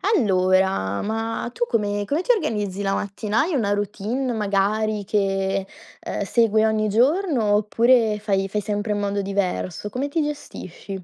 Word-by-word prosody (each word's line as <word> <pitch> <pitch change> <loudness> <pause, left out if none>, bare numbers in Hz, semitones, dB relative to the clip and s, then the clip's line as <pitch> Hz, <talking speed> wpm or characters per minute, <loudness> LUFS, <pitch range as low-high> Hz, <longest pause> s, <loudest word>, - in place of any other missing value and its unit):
Allora, 185 - +2
ma 225 +2 -3
tu 240 - -1
come 205 -3 -1
come 295 +9 0
ti - - +2
organizzi 210 - -1
la 195 0 0
mattina? 205 +2 -2
Hai 330 +2 0
una 205 -6 +1
routine 210 +6 -2
magari 210 0 0
che, 195 -1 0 0.4
ehm, - - -4
segui 220 +1 +2
ogni 220 -1 +1
giorno 250 - +2
oppure 220 +1 +3
fai 195 -2 0
fai 210 +2 -2
sempre 205 +1 -2
in 205 - -2
modo 200 0 -1
diverso? 195 -1 -2
Come 255 +6 -2
ti 315 +3 -1
gestisci? 200 - -6
210 Hz, 150 wpm, -23 LUFS, 195-230 Hz, 0.4 s, oppure